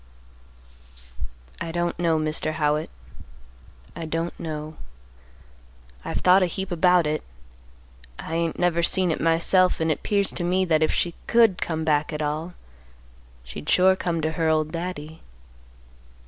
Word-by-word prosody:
"I 165 - -3
don't 175 0 -2
know, 165 -2 +2
Mr. 155 0 -1
Howitt; 150 0 0 1.1
I 165 - -5
don't 165 +2 -3
know. 155 -1 -6 1.3
I've - - -3
thought 185 +1 +5
a 185 - +3
heap 190 +2 -5
about 180 0 +3
it, 150 0 -1 1.0
I 160 - -7
ain't 165 -1 -1
never 175 -1 +1
seen 180 +1 +2
it - - -3
myself, 170 +3 +3
and 160 0 +1
it 150 - -2
'pears 200 -2 0
to 175 - -4
me 185 +2 +1
that 160 -3 +2
if 155 - +2
she 175 - -1
could 230 -5 +4
come 160 -1 -2
back 150 0 +1
at 150 - -4
all, 155 +4 -3 0.9
she'd 75 +5 -8
sure 190 +1 +5
come 170 -3 -2
to 155 +1 -1
her 160 0 0
old 155 -1 +1
Daddy. 165 -2 -6
165 Hz, 150 wpm, -24 LUFS, 155-180 Hz, 1.3 s, thought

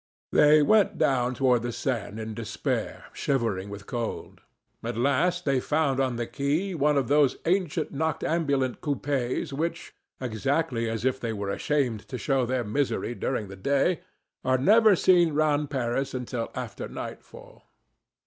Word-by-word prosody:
They 150 0 +6
went 210 +4 +3
down 125 -2 +1
toward 125 -3 +3
the 120 +1 -3
Seine, 115 -4 -3
in 110 0 -5
despair, 115 -1 -3
shivering 115 -8 -1
with 100 0 -8
cold. 120 -2 -5 0.4
At - - -4
last 140 +8 +1
they 135 -2 +2
found 145 -1 0
on 130 -2 +1
the 120 0 -2
quay 150 +11 -1
one 150 -2 +2
of 135 -4 +1
those 145 -1 +3
ancient 180 -2 0
noctambulent 145 -3 0
coupés 140 -1 -2
which, 165 +3 -3 0.3
exactly 130 0 -1
as 110 +1 -3
if 130 0 +1
they 115 -3 -3
were 100 -2 -3
ashamed 125 -4 -1
to 125 - -5
show 135 -2 0
their 130 0 0
misery 120 +1 -1
during 120 -3 -2
the 95 - -9
day, 140 - +1 0.4
are 130 0 +2
never 215 - +6
seen 175 -3 +4
round 150 -1 +2
Paris 130 0 -1
until 125 -2 -3
after 120 -5 -5
nightfall. - - -10
135 Hz, 150 wpm, -27 LUFS, 120-150 Hz, 0.4 s, They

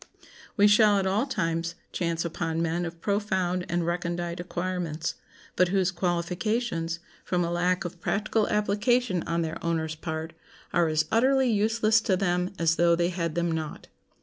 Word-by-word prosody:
We 205 - +6
shall 210 0 +5
at 195 - 0
all 205 +8 +1
times 165 -7 -1 0.2
chance 170 -1 -1
upon 165 -1 -2
men 170 +1 0
of 165 0 -7
profound 190 -3 0
and 175 0 0
recondite 175 0 -2
acquirements, 175 -2 -3 0.4
but 180 - +4
whose 190 0 +1
qualifications, 175 0 -1 0.3
from 180 -1 0
a 170 - -2
lack 180 +2 +1
of 175 0 -7
practical 215 +1 0
application 210 0 +1
on 170 0 0
their 160 0 -5
owners' 160 -2 -1
part, 160 0 -5 0.4
are 175 -1 +3
as 155 0 +1
utterly 260 +2 +3
useless 220 +1 +3
to 190 -4 +1
them 180 -1 0
as 165 -1 +2
though 170 0 +4
they 170 +1 +1
had 170 -3 -3
them 170 0 0
not. 160 -2 -5
175 Hz, 160 wpm, -27 LUFS, 170-200 Hz, 0.4 s, We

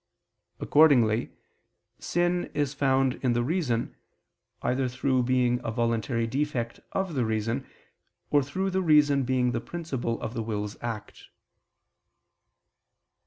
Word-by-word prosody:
Accordingly 125 -7 +4 0.7
sin 175 +1 0
is 145 -2 0
found 135 -2 +1
in 125 -2 +2
the 120 0 +1
reason, 130 -6 -1 0.7
either 130 +2 +1
through 130 +1 0
being 125 -1 +1
a - - -3
voluntary 115 0 0
defect 125 -2 -2
of 190 -3 -1
the 130 -4 +1
reason, 115 +4 -2 0.6
or 145 - +5
through 190 +8 -2
the 190 +1 +1
reason 150 -5 +4
being 125 -1 +1
the 115 -1 -2
principle 130 -5 -4
of 110 - -5
the 115 - -3
will's 105 -1 -3
act. 115 -3 -6
130 Hz, 120 wpm, -27 LUFS, 115-145 Hz, 0.7 s, or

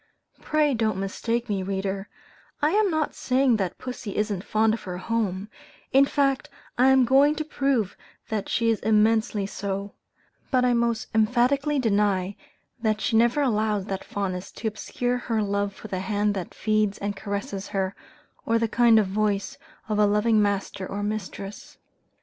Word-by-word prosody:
Pray 305 -2 +2
don't 220 -4 0
mistake 230 +5 -2
me, 200 -3 -1
reader, 195 +1 -3 0.5
I 300 +2 +2
am 420 0 +3
not 315 -3 0
saying 255 -2 +2
that 190 -4 -2
pussy 245 -5 -6
isn't 210 -3 -1
fond 220 0 +2
of 225 - -3
her 180 -2 -6
home, 200 -2 -2 0.4
in 270 +1 +6
fact 275 -2 0 0.3
I 255 +2 +4
am 265 -1 +5
going 275 +4 +5
to 310 0 -3
prove 275 -9 0 0.3
that 210 -2 -2
she 230 -1 +2
is 220 - 0
immensely 215 -1 +2
so; 200 0 -4 0.6
but 255 -2 +3
I 245 - +3
most 235 -1 0
emphatically 250 +6 +2
deny, 205 -5 +1 0.5
that 215 -2 +1
she 225 0 +3
ever 240 +5 +2
allows 215 -5 +1
that 195 -2 -4
fondness, 190 -2 -4
to 225 - -4
obscure 245 +4 -2
her 225 -3 -1
love 200 0 -1
for 200 - -11
the 190 -3 -3
hand 205 +1 0
that 190 -3 -6
feeds 215 -2 +1
and 205 0 -3
caresses 200 -1 -4
her, 190 -1 -2 0.5
or 230 - +2
the 230 0 +1
kind 230 0 +5
voice 200 +1 -1 0.3
of 210 -1 -1
a 210 - +5
loving 210 +1 +3
master 200 -1 -1
or 205 +1 -4
mistress. 205 -1 -5
215 Hz, 165 wpm, -25 LUFS, 200-240 Hz, 0.6 s, in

